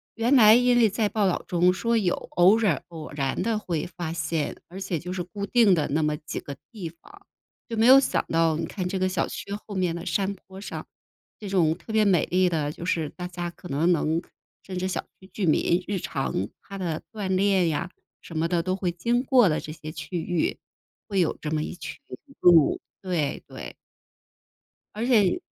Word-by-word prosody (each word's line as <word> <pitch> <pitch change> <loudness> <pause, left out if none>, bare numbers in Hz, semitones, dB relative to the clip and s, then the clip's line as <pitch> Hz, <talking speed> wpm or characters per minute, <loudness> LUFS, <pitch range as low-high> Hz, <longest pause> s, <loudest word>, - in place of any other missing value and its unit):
原 235 +3 +1
来 215 -2 +8
因 245 0 +4
为 225 -3 +5
在 210 +1 0
报 210 -2 +1
道 180 - -1
中 180 +1 +3
说 230 +4 +1
有 185 -5 +1
偶 185 +5 +3
尔 185 - +1
偶 160 -2 -8
然 135 0 -2
地 225 0 0
会 170 -7 -3
发 170 -2 -3
现， 155 -1 -2
而 185 +3 -8
且 185 -3 -2
就 180 +4 -7
是 185 - -3
固 200 +3 -5
定 225 -4 +4
的 150 -3 0
那 155 +3 +1
么 150 0 +1
几 150 - -6
个 140 - -8 0.2
地 200 -8 -6
方。 390 - -18 0.4
就 230 - -3
没 220 - +4
有 265 +1 +10
想 265 - 0
到 165 -1 +2
你 165 - -2
看 185 +2 -5
这 190 +1 -2
个 185 - +2
小 185 -2 0
区 - - -6 0.2
后 205 - -6
面 180 -3 0
的 170 - -6
山 195 0 0
坡 190 0 -13
上， - - -6 0.5
这 210 - -7
种 170 -5 +3
特 220 - -9
别 220 -1 +4
美 185 -6 +3
丽 185 0 +2
的 155 -4 -1
就 160 - -9
是 165 -3 0
大 180 +3 -7
家 175 -1 -4
可 175 +1 -12
能 150 +5 +1
能 160 0 0 0.4
甚 185 -1 -6
至 185 - -1
小 - - -3 0.2
区 190 - -14
居 200 - -1
民 170 +3 +2
日 205 - -1
常 135 - -2
他 195 - -9
的 170 -5 -3
锻 205 -3 -4
炼 190 -2 +3
呀， 165 +3 -2 0.3
什 165 - -8
么 165 - +1
的 175 -1 +1
都 185 +1 0
会 185 -2 -1
经 235 +9 0
过 255 -5 +5
的 155 - 0
这 150 - -7
些 155 -1 -9
区 160 +3 -5
域 170 0 -1 0.5
会 200 -3 0
有 170 - 0
这 150 - -3
么 155 -1 0
一 - - -5
群 - - -7 0.5
鹿， 170 -4 +6 0.2
对， 165 -6 -1
对。 - - -8 1.2
而 225 - -2
且 215 -8 +3
180 Hz, 230 characters per minute, -25 LUFS, 165-205 Hz, 1.2 s, 有